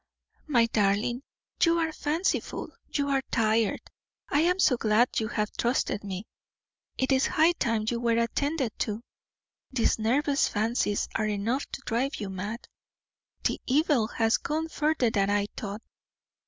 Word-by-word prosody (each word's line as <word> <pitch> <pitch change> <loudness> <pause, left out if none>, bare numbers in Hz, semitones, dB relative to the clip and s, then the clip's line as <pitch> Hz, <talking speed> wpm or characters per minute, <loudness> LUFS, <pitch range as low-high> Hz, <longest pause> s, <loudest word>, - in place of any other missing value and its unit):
"My 240 -6 +4
darling, 215 +3 +1 0.4
you 335 0 +4
are 325 -1 0
fanciful, 310 +5 -1 0.2
you 285 -1 0
are 270 -1 +2
tired. 220 -2 +1 0.5
I 290 - +2
am 355 +3 +3
so 305 -9 +4
glad 230 +1 +2
you 220 - -1
have 210 -2 -2
trusted 240 -3 0
me; 195 0 -5 0.7
it 260 +1 0
is 265 0 +3
high 320 +2 +4
time 230 -10 -1
you 235 0 0
were 235 -1 +2
attended 265 +2 -1
to. 215 +2 -2 0.7
These 240 -3 +1
nervous 275 +6 +2
fancies 215 -1 0
are 215 - 0
enough 215 +6 -1
to 275 - -6
drive 255 +5 0
you 200 -3 -5
mad; 205 +5 -5 0.8
the - - 0
evil 275 -4 +3
has 225 0 +2
gone 315 +2 -2
further 300 -7 +1
than 200 -2 +1
I 205 0 +2
thought. 210 +1 -6
235 Hz, 150 wpm, -28 LUFS, 215-285 Hz, 0.8 s, My